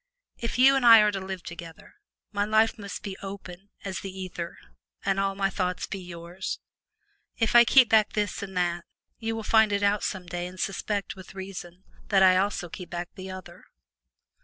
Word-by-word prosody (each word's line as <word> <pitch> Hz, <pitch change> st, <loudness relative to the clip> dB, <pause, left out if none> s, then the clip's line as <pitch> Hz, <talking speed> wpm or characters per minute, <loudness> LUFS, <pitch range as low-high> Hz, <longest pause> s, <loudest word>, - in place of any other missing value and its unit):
If 230 Hz, -, -3 dB
you 270 Hz, +2 st, +7 dB
and 270 Hz, -, +1 dB
I 230 Hz, -2 st, +10 dB
are 210 Hz, 0 st, +3 dB
to 195 Hz, -, -3 dB
live 190 Hz, -1 st, -6 dB
together, 170 Hz, -1 st, -10 dB, 0.4 s
my 205 Hz, -1 st, 0 dB
life 220 Hz, +1 st, +3 dB
must 200 Hz, -1 st, -7 dB
be 195 Hz, -2 st, -5 dB
open 195 Hz, -1 st, -9 dB, 0.2 s
as 190 Hz, -2 st, -3 dB
the 195 Hz, -, -6 dB
ether 185 Hz, -2 st, -6 dB, 0.5 s
and 195 Hz, 0 st, +1 dB
all 195 Hz, 0 st, 0 dB
my 195 Hz, 0 st, 0 dB
thoughts 180 Hz, -1 st, -2 dB
be 195 Hz, -, -6 dB
yours. 175 Hz, +1 st, -6 dB, 0.8 s
If 225 Hz, -2 st, +1 dB
I 240 Hz, 0 st, +9 dB
keep 255 Hz, -1 st, +6 dB
back 215 Hz, -1 st, +4 dB
this 210 Hz, -1 st, -1 dB
and 190 Hz, -2 st, -6 dB
that, 175 Hz, -1 st, 0 dB, 0.4 s
you 225 Hz, 0 st, -2 dB
will 225 Hz, -, -4 dB
find 220 Hz, -1 st, +4 dB
it 200 Hz, 0 st, 0 dB
out 205 Hz, 0 st, +3 dB
some 190 Hz, -3 st, -3 dB
day 175 Hz, 0 st, -4 dB
and 185 Hz, +1 st, -11 dB
suspect, 200 Hz, +2 st, -2 dB
with 190 Hz, 0 st, -12 dB
reason, 190 Hz, -2 st, -8 dB, 0.2 s
that 195 Hz, -2 st, +4 dB
I 185 Hz, -1 st, +6 dB
also 195 Hz, -1 st, 0 dB
keep 180 Hz, +2 st, -9 dB
back 175 Hz, 0 st, -4 dB
the 190 Hz, 0 st, -8 dB
other. 185 Hz, -1 st, -10 dB
195 Hz, 195 wpm, -27 LUFS, 180-210 Hz, 0.8 s, I